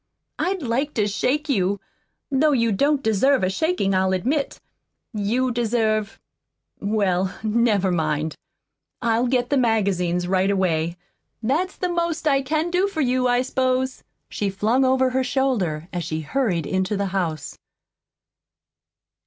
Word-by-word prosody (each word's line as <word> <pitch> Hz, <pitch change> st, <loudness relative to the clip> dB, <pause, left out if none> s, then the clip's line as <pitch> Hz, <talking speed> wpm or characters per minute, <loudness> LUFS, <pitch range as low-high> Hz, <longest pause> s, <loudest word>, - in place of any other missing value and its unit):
"I'd 375 Hz, -3 st, -1 dB
like 265 Hz, +5 st, -1 dB
to 210 Hz, -, +2 dB
shake 265 Hz, +9 st, 0 dB
you 200 Hz, -7 st, +1 dB, 0.5 s
though 290 Hz, +2 st, +3 dB
you 230 Hz, -3 st, +2 dB
don't 280 Hz, +7 st, +1 dB
deserve 240 Hz, +3 st, +3 dB
a 185 Hz, -, +1 dB
shakin', 315 Hz, -, 0 dB
I'll 190 Hz, 0 st, +2 dB
admit. 265 Hz, -, -1 dB, 0.5 s
You 230 Hz, +5 st, 0 dB
deserve 225 Hz, -3 st, 0 dB, 0.6 s
well, 195 Hz, -3 st, 0 dB
never 215 Hz, -4 st, +2 dB
mind. 155 Hz, -2 st, -1 dB, 0.7 s
I'll 235 Hz, +1 st, +2 dB
get 245 Hz, 0 st, 0 dB
the 285 Hz, -, +3 dB
magazines 190 Hz, -7 st, +1 dB
right 190 Hz, +1 st, +2 dB
away. 170 Hz, -4 st, 0 dB, 0.5 s
That's 315 Hz, +11 st, 0 dB
the 365 Hz, -, -2 dB
most 340 Hz, -2 st, -1 dB
I 275 Hz, -2 st, +3 dB
CAN 310 Hz, +5 st, -1 dB
do 365 Hz, +3 st, +2 dB
for 355 Hz, -6 st, -3 dB
you, 255 Hz, -1 st, +2 dB
I 245 Hz, 0 st, +2 dB
s'pose," 260 Hz, 0 st, -1 dB, 0.2 s
she 205 Hz, -, -2 dB
flung 215 Hz, +7 st, +1 dB
over 260 Hz, 0 st, +3 dB
her 260 Hz, +1 st, +1 dB
shoulder, 240 Hz, -, 0 dB
as 175 Hz, -1 st, -2 dB
she 160 Hz, -1 st, -3 dB
hurried 180 Hz, -, -1 dB
into 190 Hz, +4 st, -1 dB
the 200 Hz, -, 0 dB
house. 165 Hz, -6 st, -3 dB
230 Hz, 140 wpm, -23 LUFS, 190-265 Hz, 0.7 s, though